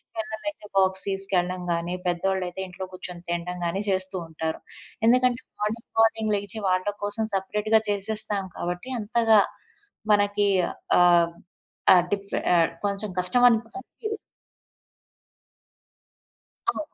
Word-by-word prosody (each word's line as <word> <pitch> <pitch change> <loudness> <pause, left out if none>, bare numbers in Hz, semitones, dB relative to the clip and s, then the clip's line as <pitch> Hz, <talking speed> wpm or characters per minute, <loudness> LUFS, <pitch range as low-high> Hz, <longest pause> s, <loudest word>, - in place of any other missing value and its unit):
పిల్లలైతే 220 +3 -5
బాక్స్ 190 0 +4
తీసుకెళ్ళడం 185 -2 0
గాని, 170 +1 -2
పెద్దోళ్ళయితే 185 +1 -1
ఇంట్లో 185 +1 -7
కూర్చొని 180 -1 -8
తినడం 175 +1 -3
గాని, 190 +4 -1
చేస్తూ 190 0 +1
ఉంటారు. 160 0 -4 0.5
ఎందుకంటే, 250 0 +3 0.2
మార్నింగ్ 220 +2 -3
మార్నింగ్ 220 -1 +3
లేచి 205 +2 -4
వాళ్ళ 185 +1 +1 0.2
కోసం 205 +2 +1
సెపరేట్‌గా 210 +3 +1
చేసేస్తాం 205 0 +2
కాబట్టి, 180 +9 -4
అంతగా 225 0 +3 0.7
మనకి 205 0 +2 0.5
ఆహ్, 175 -1 +5 0.6
ఆ - - +7 0.2
డిఫె 200 0 -3 0.4
కొంచెం 200 +1 -2
కష్టమనిపీయదు. 245 - +1 2.5
ఆ! - - 0
200 Hz, 100 wpm, -25 LUFS, 180-220 Hz, 2.5 s, ఆ